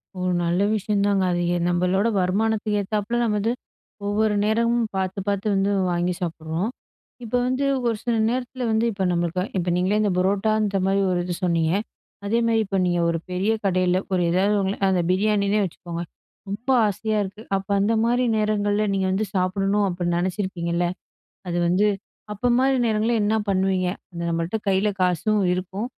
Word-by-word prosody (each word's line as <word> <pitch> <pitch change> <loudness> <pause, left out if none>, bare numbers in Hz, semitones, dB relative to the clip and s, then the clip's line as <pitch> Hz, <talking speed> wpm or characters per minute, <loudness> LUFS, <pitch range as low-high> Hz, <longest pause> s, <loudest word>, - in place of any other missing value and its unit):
ஓ - - -7 0.2
நல்ல 175 +3 +1
விஷயந்தாங்க, 200 -1 +1
அது 175 - 0 0.2
எ - - +1
நம்பளோட 180 +4 +1
வருமானத்துக்கு 210 +3 0
ஏத்தாப்புல, 210 +3 -2
நம்ம 215 -2 +1
வந்து 225 +4 0 0.5
ஒவ்வொரு 210 +1 +1
நேரமும் 230 +2 +2
பாத்து 190 +1 -2
பாத்து 200 +1 -1
வந்து 195 +1 +1 0.2
வாங்கி 175 +1 0
சாப்பிடுறோம். 165 +4 -3 0.5
இப்போ 235 +2 -1
வந்து 260 +2 0 0.2
ஒரு 230 - +1
சில 240 -2 0
நேரத்தில 250 +1 -3
வந்து, 220 +1 +2
இப்போ 195 -2 -3
நம்மளுக்கு 175 +1 0
இப்போ 175 0 -1
நீங்களே 195 +4 +1
இந்த 205 -2 +1
புரோட்டா 195 +3 +2
அந்த 200 -2 0
மாரி 195 +1 +2
ஒரு 175 - +1
இது 175 -1 -3
சொன்னீங்க, 165 -2 +2 0.5
அதே 230 +3 +1
மாரி 225 -1 +2
இப்போ 195 0 -2
நீங்க 175 -1 +1
ஒரு 165 - 0
பெரிய 190 +4 0
கடைல 185 -1 +2 0.2
ஒரு 180 - +2
ஏதாவது 195 +4 +2
உங்கள 195 +1 -1
அந்த 180 -2 +2
பிரியாணின்னே 205 +1 +2
வச்சுக்கோங்க, 170 -1 -6 0.5
ரொம்ப 225 +7 -5 0.2
ஆசையா 215 +2 -1
இருக்கு. 200 +3 -8 0.2
அப்ப 195 +1 -8
அந்த 210 +3 +2
மாரி 245 +1 +2
நேரங்கள்ல 210 0 +1
நீங்க 190 -1 0
வந்து 205 +3 0
சாப்பிடணும் 195 +2 +1
அப்டி 175 -1 -2
நெனச்சிருப்பீங்கள்ல, 175 -2 -1 0.6
அது 175 - -2
வந்து 190 +4 +3 0.5
அப்போ 245 +4 -1
மாரி 265 0 +3
நேரங்கள்ல 220 +2 +1
என்ன 220 +1 +2
பண்ணுவீங்க? 190 -1 +1 0.2
அந்த 170 0 -5
நம்மள்ட்ட 165 +4 -1
கைல 195 +2 +2
காசும் 185 +4 +1
இருக்கும், 190 +5 -4
195 Hz, 165 wpm, -23 LUFS, 180-215 Hz, 0.6 s, வந்து